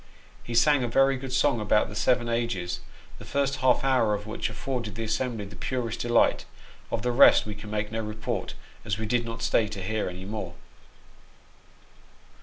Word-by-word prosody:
He 120 Hz, -, -5 dB
sang 145 Hz, +2 st, +4 dB
a -, -, 0 dB
very 135 Hz, +3 st, +3 dB
good 130 Hz, 0 st, -6 dB
song 130 Hz, -1 st, +2 dB
about 105 Hz, 0 st, +2 dB
the -, -, -9 dB
seven 120 Hz, +2 st, +2 dB
ages, 115 Hz, -7 st, -2 dB, 0.4 s
the -, -, -10 dB
first 140 Hz, -1 st, -1 dB
half 130 Hz, -1 st, +3 dB
hour 125 Hz, -6 st, +3 dB
of 105 Hz, 0 st, -6 dB
which 110 Hz, 0 st, -3 dB
afforded 115 Hz, -1 st, -4 dB
the 115 Hz, -, -4 dB
assembly 110 Hz, 0 st, -2 dB
the 100 Hz, +1 st, -11 dB
purest 120 Hz, -2 st, -3 dB
delight; 120 Hz, -1 st, +2 dB, 0.4 s
of 110 Hz, -, -2 dB
the 125 Hz, -, +1 dB
rest 120 Hz, -, +6 dB
we 105 Hz, -, -5 dB
can 105 Hz, +1 st, -10 dB
make 105 Hz, 0 st, -2 dB
no 115 Hz, 0 st, -2 dB
report, 110 Hz, 0 st, -4 dB, 0.3 s
as 105 Hz, -3 st, -2 dB
we 110 Hz, -, -3 dB
did 120 Hz, +2 st, 0 dB
not 115 Hz, 0 st, -6 dB
stay 115 Hz, -1 st, +2 dB
to 100 Hz, -2 st, -6 dB
hear 110 Hz, 0 st, -1 dB
any 90 Hz, +1 st, -8 dB
more. 100 Hz, -4 st, -5 dB
115 Hz, 190 wpm, -27 LUFS, 105-125 Hz, 0.4 s, rest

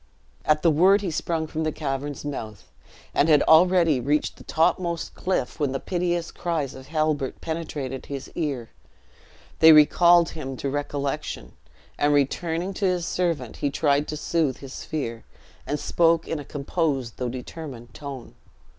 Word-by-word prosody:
At 150 Hz, 0 st, +2 dB
the 170 Hz, -, +5 dB
word 190 Hz, +6 st, +5 dB
he 190 Hz, -4 st, -2 dB
sprung 160 Hz, 0 st, -1 dB
from 160 Hz, +1 st, -3 dB
the 155 Hz, -, 0 dB
cavern's 145 Hz, -1 st, -4 dB
mouth, 110 Hz, -8 st, -6 dB, 0.4 s
and 150 Hz, -, +3 dB
had 150 Hz, -2 st, +6 dB
already 165 Hz, -3 st, +5 dB
reached 145 Hz, +5 st, 0 dB
the -, -, -13 dB
topmost 170 Hz, +1 st, 0 dB
cliff 180 Hz, -6 st, -2 dB
when 140 Hz, -3 st, 0 dB
the 135 Hz, -, -1 dB
piteous 175 Hz, 0 st, -1 dB
cries 160 Hz, -6 st, -2 dB
of 130 Hz, 0 st, -11 dB
Halbert 155 Hz, -3 st, -1 dB
penetrated 150 Hz, -5 st, -5 dB
his 140 Hz, -1 st, -6 dB
ear; 140 Hz, -8 st, -3 dB, 0.9 s
they 160 Hz, 0 st, +9 dB
recalled 170 Hz, +3 st, +6 dB
him 135 Hz, -4 st, -6 dB
to 140 Hz, -, -3 dB
recollection, 145 Hz, -1 st, -3 dB, 0.5 s
and 145 Hz, 0 st, +3 dB
returning 165 Hz, +6 st, 0 dB
to 195 Hz, -, -2 dB
his 180 Hz, -2 st, 0 dB
servant, 165 Hz, -11 st, -2 dB
he 145 Hz, -, 0 dB
tried 145 Hz, 0 st, +1 dB
to 150 Hz, -, -4 dB
soothe 155 Hz, -3 st, 0 dB
his 135 Hz, -1 st, -8 dB
fear, 115 Hz, -7 st, -4 dB, 0.4 s
and 145 Hz, +1 st, -1 dB
spoke 165 Hz, +1 st, +2 dB
in 160 Hz, -, -2 dB
a 145 Hz, -, -8 dB
composed 140 Hz, -4 st, -2 dB
though 125 Hz, -1 st, -2 dB
determined 125 Hz, -1 st, -8 dB
tone. 140 Hz, -4 st, -8 dB
150 Hz, 155 wpm, -25 LUFS, 135-165 Hz, 0.9 s, they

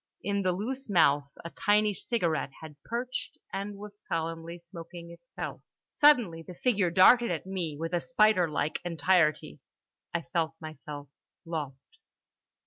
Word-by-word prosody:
In 200 Hz, 0 st, 0 dB
the 185 Hz, -1 st, +2 dB
loose 245 Hz, +8 st, -4 dB
mouth 145 Hz, -6 st, +4 dB, 0.2 s
a 170 Hz, -, -5 dB
tiny 210 Hz, 0 st, +3 dB
cigarette 175 Hz, -, -1 dB
had 155 Hz, -2 st, -10 dB
perched 245 Hz, +2 st, -4 dB, 0.2 s
and 200 Hz, +1 st, -3 dB
was 210 Hz, 0 st, -9 dB, 0.2 s
solemnly 165 Hz, +1 st, -3 dB
smoking 170 Hz, 0 st, -10 dB
itself. 255 Hz, +10 st, -7 dB, 0.3 s
Suddenly 240 Hz, -, +4 dB
the 180 Hz, +2 st, -10 dB
figure 205 Hz, -4 st, +2 dB
darted 215 Hz, +7 st, +6 dB
at 170 Hz, 0 st, -2 dB
me 180 Hz, -6 st, -3 dB
with 165 Hz, +2 st, -4 dB
a 175 Hz, -, +1 dB
spiderlike 180 Hz, -, +2 dB
entirety. 160 Hz, -3 st, +2 dB, 0.5 s
I 170 Hz, -1 st, -2 dB
felt 165 Hz, -1 st, 0 dB
myself 150 Hz, -2 st, -8 dB, 0.4 s
lost. 155 Hz, -, -6 dB
175 Hz, 135 wpm, -29 LUFS, 160-205 Hz, 0.5 s, darted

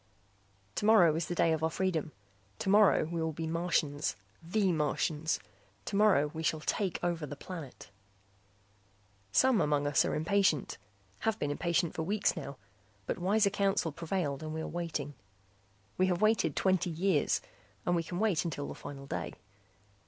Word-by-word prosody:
Tomorrow 205 Hz, -, +5 dB
is 160 Hz, +1 st, -2 dB
the 175 Hz, -, -3 dB
day 165 Hz, -1 st, +3 dB
of 160 Hz, 0 st, -2 dB
our 160 Hz, -, +3 dB
freedom. 165 Hz, -3 st, -1 dB, 0.5 s
Tomorrow 200 Hz, -, +4 dB
we 165 Hz, +1 st, -3 dB
will 160 Hz, 0 st, -1 dB
be 160 Hz, +2 st, -4 dB
Martians, 160 Hz, -3 st, 0 dB, 0.3 s
the 190 Hz, +3 st, +1 dB
Martians. 155 Hz, 0 st, 0 dB, 0.5 s
Tomorrow 195 Hz, -8 st, +3 dB
we 160 Hz, -, -4 dB
shall 155 Hz, -1 st, 0 dB
take 190 Hz, +2 st, -1 dB
over 170 Hz, -3 st, -1 dB
the 145 Hz, -, -6 dB
planet. 160 Hz, -3 st, -9 dB, 1.4 s
Some 260 Hz, -, +4 dB
among 145 Hz, -1 st, +1 dB
us 145 Hz, 0 st, +3 dB
are -, -, -1 dB
impatient, 165 Hz, -2 st, +1 dB, 0.4 s
have 225 Hz, -1 st, 0 dB
been 145 Hz, -, -1 dB
impatient 170 Hz, +2 st, 0 dB
for -, -, -3 dB
weeks 200 Hz, +5 st, +1 dB
now, -, -, -6 dB, 0.5 s
but -, -, -3 dB
wiser 200 Hz, +3 st, +3 dB
counsel 195 Hz, -4 st, +1 dB
prevailed 160 Hz, -3 st, -2 dB
and 155 Hz, 0 st, -5 dB
we 160 Hz, -, -3 dB
are -, -, -4 dB
waiting. 160 Hz, -4 st, -4 dB, 0.9 s
We 185 Hz, -, +4 dB
have 180 Hz, -2 st, 0 dB
waited 215 Hz, +1 st, +2 dB
twenty 185 Hz, -2 st, +2 dB
years 170 Hz, -1 st, +1 dB, 0.5 s
and 175 Hz, -, +2 dB
we 170 Hz, -, +1 dB
can 175 Hz, +2 st, -6 dB
wait 205 Hz, -5 st, +2 dB
until 145 Hz, -4 st, -4 dB
the -, -, -6 dB
final 140 Hz, -1 st, -9 dB
day. -, -, -4 dB
170 Hz, 160 wpm, -31 LUFS, 155-190 Hz, 1.4 s, Tomorrow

